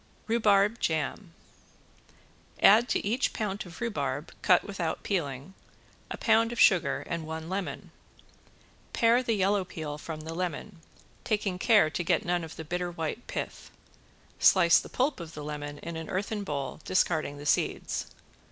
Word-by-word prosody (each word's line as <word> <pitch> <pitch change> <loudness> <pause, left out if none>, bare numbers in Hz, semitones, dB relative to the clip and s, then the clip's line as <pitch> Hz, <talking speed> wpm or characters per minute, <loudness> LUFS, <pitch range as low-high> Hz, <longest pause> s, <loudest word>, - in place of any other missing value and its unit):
~RHUBARB 215 -1 +3
JAM~ 160 +4 -2 1.3
Add 225 +4 +6
to - - 0
each 235 +6 0
pound 205 -3 -3
of 175 - -12
rhubarb 145 - -3
cut 180 - +4
without 180 -6 -3
peeling, 145 -3 -3 0.6
a - - -5
pound 225 0 +3
of 240 - -5
sugar 170 -9 +4
and 170 -1 -3
one 160 +1 -6
lemon. 190 0 -4 1.0
Pare 235 +2 +4
the 235 -3 0
yellow 195 0 +2
peel 155 -4 -6
from 155 0 -6
the 160 +1 -6
lemon, 180 +2 -4 0.4
taking 205 -4 -1
care 205 -7 +4
to 175 - -2
get 175 +1 +1
none 175 -1 0
of 160 - -8
the 160 - -7
bitter 175 +2 -2
white 170 +7 -5
pith. - - -5 0.7
Slice 170 -3 +6
the - - -9
pulp 265 0 0
of 165 -2 -8
the 150 - -6
lemon 145 -1 -5
in 170 - -5
an 160 -1 -6
earthen 205 +2 -2
bowl, 140 -7 -4
discarding 160 -5 0
the 145 - -9
seeds. - - 0
180 Hz, 155 wpm, -28 LUFS, 160-210 Hz, 1.3 s, Add